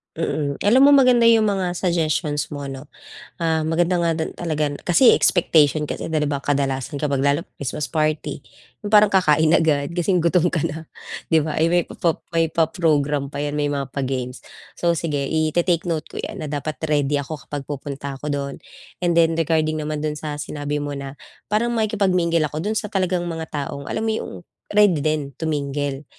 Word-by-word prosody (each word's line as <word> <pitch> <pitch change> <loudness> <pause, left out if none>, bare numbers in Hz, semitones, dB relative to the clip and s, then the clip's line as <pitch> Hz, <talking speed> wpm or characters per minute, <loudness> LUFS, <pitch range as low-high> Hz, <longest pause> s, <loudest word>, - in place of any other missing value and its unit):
Mm, 150 -3 -2
alam 235 +6 +5
mo, - - +7
maganda 250 -4 +5
yung 225 -1 +5
mga 190 -4 -1
suggestions 160 -4 0
mo, 145 -1 -6
'no. 135 +1 -7 0.5
Ah, 160 -1 +1
maganda 170 +3 +1
nga 170 - +2
din 160 - -3
talaga 155 -4 -2
kasi 185 +8 +6
expectation 155 -4 +3
kasi, - - -4
din 160 - +1
di - - -1
ba, 140 -1 -2
kadalasan 140 -1 -1
kapag 140 -2 0
lalo 145 +6 +1
pag - - -46
Christmas 140 +1 -3
party, 155 +2 -1 0.4
yung 205 - -4
parang 210 0 +7
kakain 160 -5 +3
agad 145 -3 +1
kasi 175 +2 +1
yung 180 - +3
gutom 170 +1 +2
ka 170 - 0
na, 160 +2 -7 0.5
di 160 - +6
ba? 150 0 -3
Ay, 165 +1 +2
may 175 -1 +3
pa - - -9
pap 170 -2 0 0.2
may 165 -1 +2
pa-program 150 -4 +1
pa - - -6
'yan, 145 0 -2
may 145 -1 0
mga 140 -2 -3
pa-games. 130 -2 -3 0.3
So 170 -1 +1
sige, 165 -2 -2
ite-take 165 +2 +1
note 160 -2 -1
ko - - -4
'yan, - - -6
na - - -3
dapat 150 +1 -3
ready 145 -2 +1
ako 145 +1 -4
kapag 145 -2 -5
pupunta 140 -1 -6
ako 150 - -4
do'n 140 -1 -3 0.4
and 175 -1 +1
then 165 -1 +4
regarding 155 -1 +1
naman 150 0 -3
dun 150 -1 -2
sa 150 -1 -5
sinabi 145 0 -4
mo 145 0 -4
na 135 0 -7 0.3
parang 225 +3 +1
makikipag-mingle 190 -7 +1
ako, 155 - -3
dun 220 - -1
sa 210 -1 -3
talagang 185 -2 0
mga 165 -2 -4
taong 140 -1 -5
alam - - -2
mo 220 - +1
yung 220 - -4 0.4
ready 205 -6 +4
din 150 -2 -1
to 160 - -1
mingle, 145 -1 -2
155 Hz, 195 wpm, -22 LUFS, 145-175 Hz, 0.5 s, mo